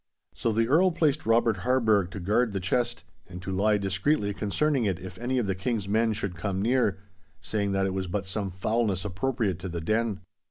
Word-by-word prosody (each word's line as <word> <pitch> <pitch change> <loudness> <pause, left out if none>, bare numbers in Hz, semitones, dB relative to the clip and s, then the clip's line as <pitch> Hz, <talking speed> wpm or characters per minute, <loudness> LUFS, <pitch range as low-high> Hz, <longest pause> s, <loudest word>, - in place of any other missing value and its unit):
So 115 - -1
the 115 +1 +1
Earl 170 +8 +5
placed 155 -4 0
Robert 115 -2 +3
Harburgh 110 -4 +2
to 100 - -7
guard 105 +5 +1
the 95 - -1
chest, 120 +6 -1 0.2
and 90 -1 -8
to 95 - -4
lie 105 +3 +2
discreetly 100 +4 0
concerning 130 +6 0
it 95 -4 0
if 95 0 -9
any 125 +2 -1
of 120 - +1
the 95 - 0
King's 100 +2 -2
men 110 +2 +2
should 100 -3 -3
come 95 +1 -2
near, 115 -2 +2 0.4
saying 100 -2 -1
that 95 0 +1
it 95 - -1
was 95 -1 -2
but 95 +2 -2
some 95 +1 -3
foulness 100 +1 -1
appropriate 105 -1 -1
to 95 +1 -5
the 85 0 -4
den. 110 +3 0
105 Hz, 205 wpm, -27 LUFS, 95-120 Hz, 0.4 s, Earl